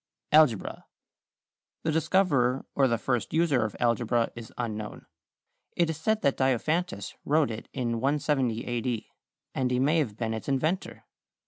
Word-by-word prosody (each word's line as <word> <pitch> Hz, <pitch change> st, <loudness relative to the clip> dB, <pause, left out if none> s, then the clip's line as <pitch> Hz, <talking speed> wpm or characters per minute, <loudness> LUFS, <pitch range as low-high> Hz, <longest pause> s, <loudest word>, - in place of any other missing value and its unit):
=Algebra.= 150 Hz, -10 st, +3 dB, 1.0 s
The 160 Hz, -, +1 dB
discoverer 150 Hz, -6 st, +2 dB
or 135 Hz, -1 st, +3 dB
the 115 Hz, -2 st, +1 dB
first 120 Hz, +2 st, -1 dB
user 155 Hz, -8 st, +3 dB
of 110 Hz, -, -3 dB
algebra 120 Hz, 0 st, +1 dB
is 115 Hz, -1 st, -9 dB
unknown. 110 Hz, -3 st, -5 dB, 0.7 s
It 170 Hz, -2 st, +3 dB
is 155 Hz, -, -6 dB
said 215 Hz, +7 st, 0 dB
that 140 Hz, -, +2 dB
Diophantus 130 Hz, -, 0 dB
wrote 150 Hz, -3 st, +2 dB
it 110 Hz, -, -7 dB
in 120 Hz, -3 st, -2 dB
170 135 Hz, -4 st, 0 dB
A. 120 Hz, -1 st, -2 dB
D., 120 Hz, -2 st, -3 dB, 0.4 s
and 130 Hz, -1 st, 0 dB
he 125 Hz, -, +1 dB
may 145 Hz, +6 st, +3 dB
have 110 Hz, -9 st, -2 dB
been 115 Hz, -1 st, -2 dB
its 110 Hz, +5 st, -5 dB
inventor. 155 Hz, +7 st, -1 dB
130 Hz, 150 wpm, -28 LUFS, 115-155 Hz, 1.0 s, =Algebra.=